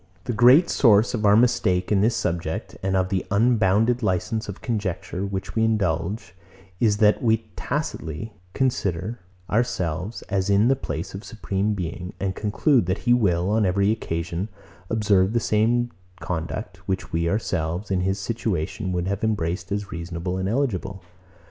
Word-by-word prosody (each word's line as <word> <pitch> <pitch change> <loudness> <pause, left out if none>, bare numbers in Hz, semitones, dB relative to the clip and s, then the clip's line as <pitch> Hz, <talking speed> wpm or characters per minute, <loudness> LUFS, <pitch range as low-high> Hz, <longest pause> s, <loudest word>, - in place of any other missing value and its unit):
The 120 - -2
great 125 - +6
source 115 -2 +4
of 110 -3 +1
our 100 - +6
mistake 110 -6 +2
in 100 -2 +4
this 115 +3 +3
subject, 85 -2 -3
and 95 0 0
of 95 0 +1
the 95 -2 0
unbounded 110 +2 +3
licence 110 +2 -1
of 100 - -6
conjecture, 100 -5 -3
which 95 -1 -4
we 110 - +1
indulge, 95 -2 0 0.5
is, 105 -3 +3
that 105 0 +4
we 110 -1 +2
tacitly 100 - -4 0.2
consider 110 -4 -1 0.3
ourselves, 95 -3 -1
as 95 -1 -1
in 100 +4 +4
the 135 - +4
place 85 -10 -5
of 95 - -5
the 105 - -13
Supreme 105 -2 -1
Being, 90 +1 -5
and 95 -1 -1
conclude, 110 - +2
that 95 +5 -2
he 120 - +5
will, 95 -5 +2
on 110 0 +3
every 100 +2 +2
occasion, 85 -2 -3 0.4
observe 105 -3 +2
the 120 - +3
same 115 +3 +1 0.3
conduct, 90 +2 -4
which 95 -1 -3
we 85 0 +1
ourselves, 90 -1 -2
in 95 -1 +1
his 95 +1 0
situation, 95 -2 -2
would 90 0 -1
have 100 +2 -2
embraced 90 -3 -1
as 100 -1 -3
reasonable 85 +2 -4
and 95 +1 -1
eligible. 100 -7 -2
100 Hz, 160 wpm, -24 LUFS, 90-110 Hz, 0.5 s, great